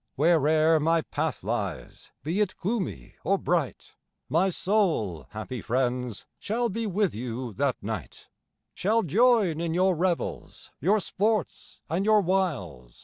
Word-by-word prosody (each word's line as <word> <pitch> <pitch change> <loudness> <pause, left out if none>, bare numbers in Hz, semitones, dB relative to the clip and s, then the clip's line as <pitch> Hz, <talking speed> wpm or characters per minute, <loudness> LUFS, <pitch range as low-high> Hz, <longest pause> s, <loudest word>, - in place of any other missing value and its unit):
Where'er 155 +1 +4
my 165 +2 +2
path 155 - -3
lies, 100 -5 -4
be 165 +7 -1
it 200 -3 -1
gloomy 185 - -3
or - - +2
bright, - - -2 0.4
My 170 +8 +3
soul, 160 - 0
happy 110 +3 -6
friends, 125 -2 -1
shall 235 +3 -1
be 225 +2 -2
with 200 -1 +1
you 120 +1 -5
that 135 +5 0
night; 105 -5 -6 0.5
Shall 220 +4 +1
join 205 - +3
in 170 -1 -1
your 185 0 +3
revels, 175 +1 -2
your 200 +8 +3
sports 210 +1 -2
and 170 +5 0
your 215 0 +5
wiles. 135 - -2
165 Hz, 135 wpm, -27 LUFS, 125-195 Hz, 0.5 s, your